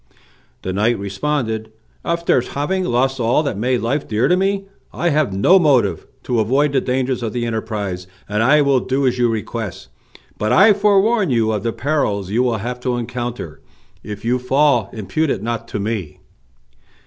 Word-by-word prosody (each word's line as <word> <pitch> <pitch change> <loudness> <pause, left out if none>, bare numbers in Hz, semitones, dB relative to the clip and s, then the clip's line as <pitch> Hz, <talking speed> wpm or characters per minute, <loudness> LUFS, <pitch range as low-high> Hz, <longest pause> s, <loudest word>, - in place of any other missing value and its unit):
The 95 - -3
knight 110 +4 +1
responded, 110 +2 -2 0.3
"After 170 -6 +1
having 180 +9 -2
lost 130 +1 +1
all 120 +6 +2
that 140 - -2
made 125 +4 0
life 135 +5 -1
dear 110 +3 +1
to 180 - +4
me 195 +1 0 0.3
I 175 - 0
have 150 -6 +1
no 105 - +5
motive 145 -8 +2 0.2
to 120 -2 0
avoid 135 +7 +2
the 135 - +2
dangers 130 0 -1
of 115 -2 -3
the 120 -1 -2
enterprise, 105 -5 -4 0.2
and 105 +1 -1
I 145 +5 +5
will 140 -2 +3
do 135 +2 -1
as 125 -1 +1
you 120 -1 +3
request; 110 -2 -4 0.5
but 105 +1 0
I 195 - +7
forewarn 205 0 +3
you 115 -3 +2
of 105 -2 -1
the 115 - -1
perils 110 -9 -1
you 115 +4 +2
will 120 -3 +1
have 120 +4 -5
to 125 0 -1
encounter. 120 - -5 0.4
If 105 +1 -8
you 125 +2 +1
fall 125 -4 +2
impute 140 +9 -2
it 100 - -2
not 115 0 -3
to 105 - -4
me." 100 -7 -4
120 Hz, 180 wpm, -19 LUFS, 110-145 Hz, 0.5 s, I